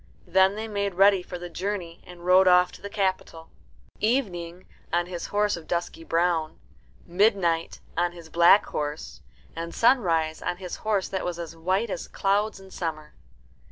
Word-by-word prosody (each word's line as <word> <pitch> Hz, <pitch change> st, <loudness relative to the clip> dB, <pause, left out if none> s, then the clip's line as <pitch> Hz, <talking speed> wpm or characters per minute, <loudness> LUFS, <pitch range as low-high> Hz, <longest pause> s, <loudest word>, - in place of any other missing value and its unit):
Then 190 Hz, +1 st, +3 dB
they 220 Hz, +1 st, -4 dB
made 200 Hz, -3 st, -2 dB
ready 195 Hz, 0 st, +5 dB
for 180 Hz, 0 st, -7 dB
the 175 Hz, 0 st, -7 dB
journey 175 Hz, -1 st, -5 dB
and 175 Hz, -1 st, -12 dB
rode 185 Hz, +1 st, +6 dB
off 180 Hz, 0 st, +5 dB
to -, -, -14 dB
the 200 Hz, -, -6 dB
capital 190 Hz, -5 st, -2 dB, 0.5 s
Evening 185 Hz, -7 st, -1 dB, 0.3 s
on 175 Hz, +1 st, +1 dB
his 175 Hz, -1 st, -6 dB
horse 205 Hz, 0 st, +1 dB
of 165 Hz, -2 st, -11 dB
dusky 170 Hz, -1 st, -3 dB
brown, 165 Hz, -1 st, 0 dB, 0.5 s
Midnight 175 Hz, -3 st, +1 dB
on 175 Hz, +1 st, +1 dB
his 170 Hz, -2 st, -12 dB
black 170 Hz, +5 st, +5 dB
horse, 150 Hz, +1 st, -5 dB, 0.3 s
and 170 Hz, +1 st, -6 dB
Sunrise 165 Hz, -11 st, +2 dB
on 180 Hz, 0 st, -2 dB
his 180 Hz, -1 st, -6 dB
horse 210 Hz, -3 st, -1 dB
that 190 Hz, -1 st, -3 dB
was 175 Hz, -1 st, -3 dB
as 165 Hz, -1 st, -7 dB
white 190 Hz, +6 st, -1 dB
as -, -, -4 dB
clouds 200 Hz, +2 st, 0 dB
in 190 Hz, 0 st, -15 dB
summer. 155 Hz, -4 st, -5 dB
180 Hz, 165 wpm, -26 LUFS, 170-195 Hz, 0.5 s, rode